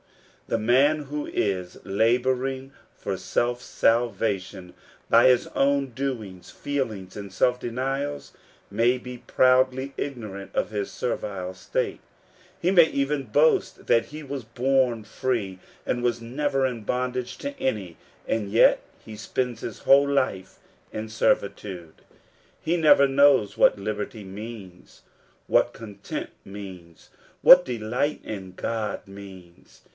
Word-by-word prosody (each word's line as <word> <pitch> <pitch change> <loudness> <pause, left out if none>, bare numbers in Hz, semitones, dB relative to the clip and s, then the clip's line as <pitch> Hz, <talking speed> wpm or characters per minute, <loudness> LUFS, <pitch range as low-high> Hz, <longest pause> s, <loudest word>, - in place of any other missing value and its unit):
The - - 0
man 135 +7 +3
who 145 +1 -5
is 95 -3 -2
laboring 130 +6 0 0.2
for 100 - -3
self»salvation 105 -2 -1 0.4
by 115 +2 +6
his 125 -1 +4
own 140 -1 +2
doings, 115 -8 -5
feel 140 -4 -2
ings, 95 -3 -10
and 100 -2 -7
self 125 +6 +2
denials, 135 +4 -3 0.4
may 115 +5 +2
be 125 0 -9
proudly 130 +2 +2
ignorant 105 -8 -6
of - - -1
his 105 -2 -3
servile 95 -6 -4
state; 95 - -3 0.6
he 175 - +1
may 170 -4 +7
even 140 0 -1
boast 145 +8 +2
that 115 -1 +4
he 155 +1 -9
was 140 -2 -5
born 125 -1 +1
free, 105 -5 -2 0.3
and 120 -1 -1
was 120 -1 +1
never 135 +3 -1
in 125 -3 -3
bondage 125 +2 -2
to 280 0 -6
any; 100 -9 -2 0.3
and 105 -3 -1
yet 115 - +5 0.2
he 110 - -9
spends 120 +2 -3
his 110 - -6
whole 140 +1 +5
life 130 -10 -1 0.3
in 110 +1 -5
servitude. 100 -5 -1 0.7
He 170 - 0
never 150 -4 +6
knows 135 -7 +4
what - - +4
liberty 105 +2 -4
means, 100 -2 -10 0.4
what - - +3
content 105 -3 -7
means, 95 -4 -11 0.3
what 180 0 +9
delight 125 +3 -2
in 95 -4 -6
God 110 +1 -3
means. 95 -3 -13
120 Hz, 125 wpm, -25 LUFS, 100-135 Hz, 0.7 s, what